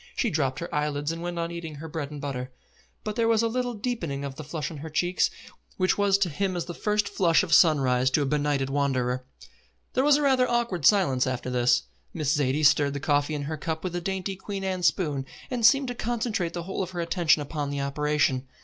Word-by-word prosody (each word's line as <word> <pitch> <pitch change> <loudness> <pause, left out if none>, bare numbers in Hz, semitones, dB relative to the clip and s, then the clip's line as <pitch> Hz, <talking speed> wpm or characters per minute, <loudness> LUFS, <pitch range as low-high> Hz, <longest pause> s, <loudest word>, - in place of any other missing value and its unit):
She 235 - 0
dropped 135 -4 0
her 170 +1 -6
eyelids 150 0 -1
and 165 0 -5
went 175 0 -4
on 170 0 -2
eating 165 -3 -6
her 155 +3 -8
bread 155 -3 -4
and 150 -1 -8
butter; 130 -3 -4 0.5
but 210 -1 -4
there 230 0 +2
was 225 0 +3
a - - +3
little 245 +1 -2
deepening 175 - -3
of 140 - -5
the 155 - -8
flush 155 +1 -4
on 160 - -7
her 155 +3 -7
cheeks 175 +4 +1 0.5
which 185 -1 +2
was 200 -1 +3
to 200 -3 +1
him 185 +5 -1
as 175 - -2
the 175 - -6
first 210 +2 0
flush 170 -3 +3
of 170 -3 -1
sunrise 130 -7 +4
to 145 +2 +2
a - - -1
benighted 145 -1 0
wanderer. 130 -3 0 0.7
There 260 - +2
was 290 0 +6
a 295 - -1
rather 260 -2 +3
awkward 235 -10 +1
silence 140 -12 +3
after 130 0 -3
this. 125 0 +3 0.3
Miss 150 -3 +1
Zaidie 145 +1 +1
stirred 145 0 +4
the - - -2
coffee 145 +2 +1
in 145 - -3
her 155 +2 -4
cup 160 +1 -4
with 180 -2 -3
a 175 - -2
dainty 190 +1 -3
Queen 195 +1 -6
Anne 185 -1 -2
spoon, 150 -6 +1 0.3
and 245 -2 -2
seemed 265 +4 +5
to - - -2
concentrate 225 -7 -2
the 175 - -4
whole 190 +3 -4
of 185 - -3
her 180 -1 -6
attention 165 -2 +2
upon 145 0 -4
the 140 0 -2
operation. 140 -2 0
160 Hz, 230 wpm, -26 LUFS, 145-195 Hz, 0.7 s, was